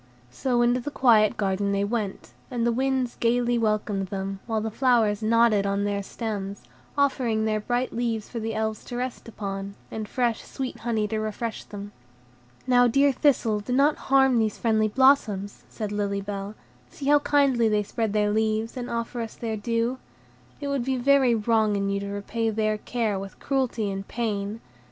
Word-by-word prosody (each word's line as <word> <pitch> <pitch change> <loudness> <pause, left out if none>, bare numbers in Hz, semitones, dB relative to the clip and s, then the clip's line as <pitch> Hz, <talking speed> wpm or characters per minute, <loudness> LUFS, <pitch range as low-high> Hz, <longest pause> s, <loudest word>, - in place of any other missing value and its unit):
So 240 - +1
into 240 +1 +3
the 250 - -4
quiet 225 -7 +4
garden 200 0 0
they 200 0 +1
went, 205 -2 -3 0.2
and 240 -3 -1
the 235 - +3
winds 260 0 0
gayly 240 0 +2
welcomed 210 -3 0
them, 195 0 -4
while 225 -2 0
the 220 +1 -3
flowers 230 -4 +2
nodded 220 -2 +3
on 200 0 0
their 205 0 -1
stems, 200 -2 -5 0.3
offering 245 -6 +1
their 215 -1 +1
bright 245 +4 -1
leaves 230 -2 -2
for 235 - -5
the 225 0 -3
Elves 220 -1 -2
to 245 - -7
rest 250 -1 -4
upon, 200 -2 -5 0.2
and 220 -1 -5
fresh, 240 -3 0
sweet 265 -2 -6
honey 220 -3 0
to 220 - -1
refresh 215 +1 -4
them. 205 0 -8 0.7
"Now, 245 -1 +5
dear 275 +4 +4
Thistle, 250 -6 +2
do 230 +5 -4
not 285 +3 +4
harm 265 -2 +5
these 215 -2 0
friendly 220 -2 +2
blossoms," 215 -5 +2
said 215 -2 -5
Lily 200 -1 -1
Bell; 200 +1 -5 0.3
"see 280 - -8
how 290 +1 +5
kindly 275 -6 +3
they 210 -1 +2
spread 220 +1 -2
their 210 0 +2
leaves, 220 +1 0
and 250 -1 -5
offer 235 +1 -3
us 225 - -6
their 225 -2 -3
dew. 230 +3 -1 0.6
It 285 - -4
would 280 -3 0
be 260 +1 -1
very 260 -1 +4
wrong 220 -1 +2
in 200 0 0
you 200 - 0
to 200 - -5
repay 205 +3 -2
their 215 0 0
care 220 -4 -1
with 195 0 -8
cruelty 250 -6 -1
and 195 0 -5
pain. 215 -2 -3
225 Hz, 185 wpm, -25 LUFS, 205-245 Hz, 0.7 s, Now